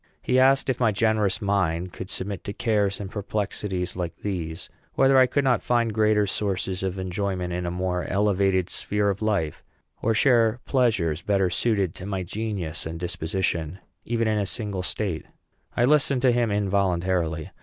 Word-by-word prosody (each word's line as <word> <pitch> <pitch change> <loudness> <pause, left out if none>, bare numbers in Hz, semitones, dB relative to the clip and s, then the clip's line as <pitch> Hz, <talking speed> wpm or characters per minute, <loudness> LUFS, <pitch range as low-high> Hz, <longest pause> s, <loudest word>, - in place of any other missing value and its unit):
He 130 0 +2
asked 135 +1 +4
if 130 -2 0
my 115 -3 +3
generous 105 -1 +1
mind 90 -3 0
could 95 - -7
submit 95 0 -4
to 100 - -4
cares 105 -4 0
and 100 -2 -6
perplexities 100 -3 -3
like 85 -2 -4
these; 85 -4 -4 0.3
whether 135 0 +4
I 130 - +6
could 140 +3 +1
not 130 -3 +2
find 120 -2 +1
greater 105 -1 +3
sources 95 -2 -1
of 95 0 -2
enjoyment 95 -1 -2
in 90 0 -2
a - - 0
more 90 0 -2
elevated 95 -2 +2
sphere 105 +1 0
of 100 - -6
life, 100 -9 -1 0.4
or 115 0 +1
share 115 -1 +4
pleasures 105 - +1
better 95 -3 +1
suited 100 -7 +1
to 95 - -8
my 95 -2 -2
genius 95 -5 -4
and 80 0 -6
disposition, 85 -1 -2 0.3
even 115 -1 0
in 110 -1 +1
a 100 - -1
single 105 -3 -3
state. 90 -2 -2 0.5
I 120 - +4
listened 140 -2 +3
to 130 - +6
him 120 -1 +1
involuntarily. 95 -5 0
100 Hz, 170 wpm, -25 LUFS, 90-110 Hz, 0.5 s, I